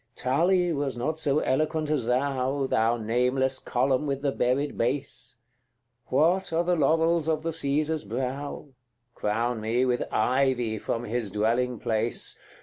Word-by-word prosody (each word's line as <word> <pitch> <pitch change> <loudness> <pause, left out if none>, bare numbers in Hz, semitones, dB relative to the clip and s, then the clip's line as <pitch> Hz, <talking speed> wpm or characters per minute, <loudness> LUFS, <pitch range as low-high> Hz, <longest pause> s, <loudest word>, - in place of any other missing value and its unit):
CX. - - -6
Tully 175 +7 +2
was 140 -4 -2
not 155 +6 -2
so 145 -1 +2
eloquent 155 +3 0
as 135 -7 0
thou, 135 +1 0
Thou 115 -2 +2
nameless 125 +4 +1
column 130 +3 0
with 140 0 -2
the 140 - +1
buried 135 +3 0
base! 125 0 -2 0.7
What 170 +8 +2
are 165 +1 +1
the 175 0 +1
laurels 160 +1 +2
of 155 -1 0
the 165 0 -2
Caesar's 155 +1 0
brow? 130 +6 -4 0.4
Crown 115 +2 -1
me 115 +4 +1
with 125 -1 0
ivy 125 -1 +1
from 115 +3 -3
his 115 -2 -2
dwelling 115 +5 0
place. 115 0 -1
130 Hz, 145 wpm, -27 LUFS, 120-150 Hz, 0.7 s, Tully